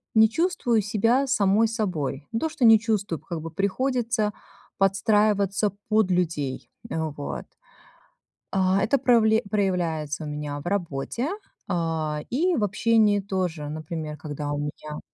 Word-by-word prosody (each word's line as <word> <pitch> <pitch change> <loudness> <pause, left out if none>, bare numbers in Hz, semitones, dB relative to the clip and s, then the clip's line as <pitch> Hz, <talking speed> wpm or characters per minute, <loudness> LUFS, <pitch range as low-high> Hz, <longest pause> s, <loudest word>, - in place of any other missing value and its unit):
не 220 0 +7
чувствую 245 -7 +1
себя 225 +7 +2
самой 215 -3 +3
собой. 165 - -3
Не 225 - -1
то 320 - 0
что 285 - -4
не 225 -1 +8
чувствую, 210 -7 -1
как 170 -3 -6
бы 165 0 -7
приходится 230 +3 0 0.5
подстраиваться 200 +1 +2 0.2
под 215 -3 +3
людей. 160 -7 -1 0.2
Э, - - -4 0.2
вот. 145 - -5 1.1
А, 190 0 +2
это 260 +6 +2
правле 225 -4 +4
проявляется 170 -7 -1
у - - -5
меня 150 -1 -4
в - - -16
работе, 180 - -2 0.4
а, 160 -3 -1
и 340 +8 +1
в 225 - 0
общении 210 0 +3
тоже, 180 -6 -3
например, 155 0 -5
когда 145 0 -4
у - - -2
меня 150 +1 -5
195 Hz, 140 wpm, -25 LUFS, 155-220 Hz, 1.1 s, не